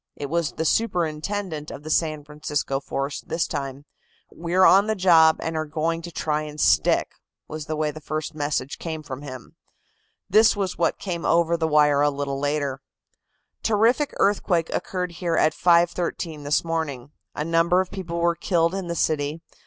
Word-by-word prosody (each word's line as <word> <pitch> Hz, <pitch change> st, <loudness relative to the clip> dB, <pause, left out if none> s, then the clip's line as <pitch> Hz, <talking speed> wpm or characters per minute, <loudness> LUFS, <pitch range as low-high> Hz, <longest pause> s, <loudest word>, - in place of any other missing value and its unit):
It 145 Hz, 0 st, -6 dB
was 170 Hz, -2 st, 0 dB
the 160 Hz, -, -3 dB
superintendent 170 Hz, -3 st, -1 dB
of 145 Hz, -, -9 dB
the 155 Hz, -, -5 dB
San 155 Hz, -3 st, 0 dB
Francisco 150 Hz, -2 st, -3 dB
force 140 Hz, +1 st, -4 dB
this 165 Hz, -, -2 dB
time. 140 Hz, -1 st, -5 dB, 0.5 s
"We're 175 Hz, +3 st, +1 dB
on 195 Hz, +3 st, +6 dB
the 220 Hz, -, +1 dB
job, 165 Hz, -4 st, +5 dB
and 160 Hz, 0 st, -3 dB
are 155 Hz, 0 st, -2 dB
going 165 Hz, +2 st, -1 dB
to 175 Hz, +1 st, -8 dB
try 155 Hz, -2 st, -1 dB
and 150 Hz, 0 st, -8 dB
stick," -, -, +3 dB, 0.4 s
was 155 Hz, -1 st, -7 dB
the 155 Hz, -, -2 dB
way 155 Hz, -1 st, 0 dB
the 155 Hz, -, -10 dB
first 155 Hz, +2 st, -4 dB
message 145 Hz, -3 st, -2 dB
came 160 Hz, -2 st, -5 dB
from 135 Hz, -2 st, -7 dB
him. 130 Hz, -4 st, -10 dB, 0.7 s
This 215 Hz, +4 st, +5 dB
was 195 Hz, -3 st, -2 dB
what -, -, 0 dB
came 175 Hz, -4 st, -4 dB
over 170 Hz, 0 st, +3 dB
the 165 Hz, -1 st, 0 dB
wire 150 Hz, -2 st, +4 dB
a 145 Hz, -, +4 dB
little 140 Hz, -1 st, -3 dB
later: 145 Hz, -2 st, -1 dB, 0.8 s
"Terrific 230 Hz, +7 st, +2 dB
earthquake 180 Hz, -4 st, +1 dB
occurred 180 Hz, -1 st, -3 dB
here 170 Hz, 0 st, -2 dB
at 155 Hz, -, +3 dB
5.13 170 Hz, -3 st, +1 dB
this 145 Hz, -, +2 dB
morning. 145 Hz, -5 st, -3 dB, 0.2 s
A 150 Hz, -, -2 dB
number 165 Hz, +2 st, +3 dB
of 185 Hz, -1 st, -2 dB
people 175 Hz, -4 st, -5 dB
were 170 Hz, 0 st, +3 dB
killed 170 Hz, 0 st, +1 dB
in 190 Hz, -2 st, -4 dB
the 170 Hz, -, -3 dB
city. 150 Hz, -1 st, 0 dB
160 Hz, 175 wpm, -24 LUFS, 150-175 Hz, 0.8 s, on